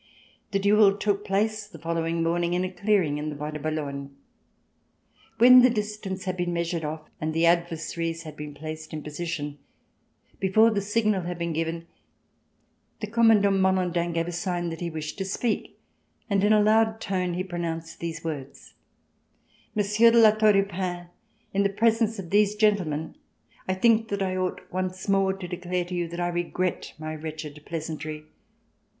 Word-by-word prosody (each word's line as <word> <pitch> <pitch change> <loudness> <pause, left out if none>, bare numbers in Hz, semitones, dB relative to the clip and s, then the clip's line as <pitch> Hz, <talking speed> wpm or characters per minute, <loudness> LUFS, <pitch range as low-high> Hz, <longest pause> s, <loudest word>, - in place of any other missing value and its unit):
The 200 - 0
duel 200 0 +4
took 205 -1 0
place 210 +2 0
the 195 -6 -12
following 165 +1 -1
morning 170 +1 +1
in 180 - +1
a 185 - -3
clearing 185 -6 +1
in 150 +1 -3
the 150 - -5
Bois 150 +1 -5
de 150 - -5
Boulogne. 140 -2 -4 1.2
When 250 +2 +9
the 255 - +6
distance 210 -4 -3
had 185 -1 -2
been 175 -1 -1
measured 170 -1 -2
off 155 +1 -5
and 155 0 -2
the 165 +1 +3
adversaries 165 -1 0
had 155 -2 -9
been 150 -1 -8
placed 155 +1 -7
m 155 - -6
position, 150 -2 -5 0.8
before 215 +4 +4
the 205 -2 0
signal 210 -1 +1
had 175 0 -4
been 170 -1 -2
given, 165 +1 -2 1.1
the - - -3
Commandant 210 -3 +4
Malandin 180 -2 +1
gave 165 0 -1
a - - -3
sign 175 0 -2
that 165 - -6
he 170 - -2
wished 155 +2 -6
to - - 0
speak, 215 +4 -2 0.5
and 200 -1 +2
in 205 - +4
a 210 -1 +5
loud 220 +1 +3
tone 185 -4 -1
he 185 - -1
pronounced 170 -3 -5
these 165 -1 -5
words: 145 -4 -7 1.0
"Monsieur 210 +2 +4
de 235 - +3
La 220 -2 +8
Tour 215 0 +4
du 195 0 +4
Pin, 180 -2 -4 0.4
in 200 - +2
the 200 - +3
presence 225 +2 +2
of 180 -4 -7
these 205 0 +3
gentlemen, 190 -8 +1 0.5
I 185 - 0
think 225 +3 +3
that 200 -2 -2
I 185 -1 -1
ought 185 -1 -2
once 185 +1 -3
more 195 -1 +3
to 190 -2 -7
declare 180 0 -3
to 180 - -8
you 175 -1 -1
that 170 +1 -7
I 175 0 0
regret 175 +1 -2
my 155 0 -5
wretched 155 -1 -7
pleasantry. 155 -1 -5
180 Hz, 175 wpm, -26 LUFS, 165-205 Hz, 1.2 s, When